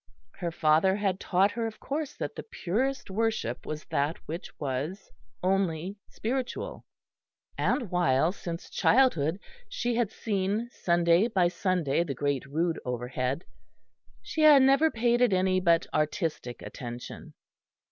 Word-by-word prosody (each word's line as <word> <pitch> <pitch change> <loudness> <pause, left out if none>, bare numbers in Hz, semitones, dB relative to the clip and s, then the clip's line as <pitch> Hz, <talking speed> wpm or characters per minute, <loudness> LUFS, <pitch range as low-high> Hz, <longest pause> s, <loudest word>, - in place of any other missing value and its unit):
Her 175 - -1
father 160 +4 +3
had 195 -2 -1
taught 195 +2 +2
her 230 -1 -2
of 220 - -8
course 295 +1 -3
that - - -5
the - - -5
purest 255 - -2
worship 215 - -1
was 155 0 -5
that 145 +4 0
which 165 +4 -5
was 145 +8 -4 0.3
only 190 0 0
spiritual; 260 - -4 0.7
and 240 -9 0
while 165 -3 +3
since 170 -3 -7
childhood 190 - +3 0.3
she 245 - -1
had 230 -3 0
seen 210 +2 -1
Sunday 170 +2 +3
by 185 -6 +2
Sunday 175 -4 0
the 140 -5 -4
Great 140 0 -1
Rood 165 +4 0
overhead, 125 +4 -2 0.8
she 320 - -3
had 295 -3 +8
never 275 +4 +5
paid 240 -1 +1
it 245 -5 +4
any 185 0 +2
but 170 -2 +3
artistic 155 -5 -2
attention. 120 -1 -8
185 Hz, 135 wpm, -28 LUFS, 155-225 Hz, 0.8 s, had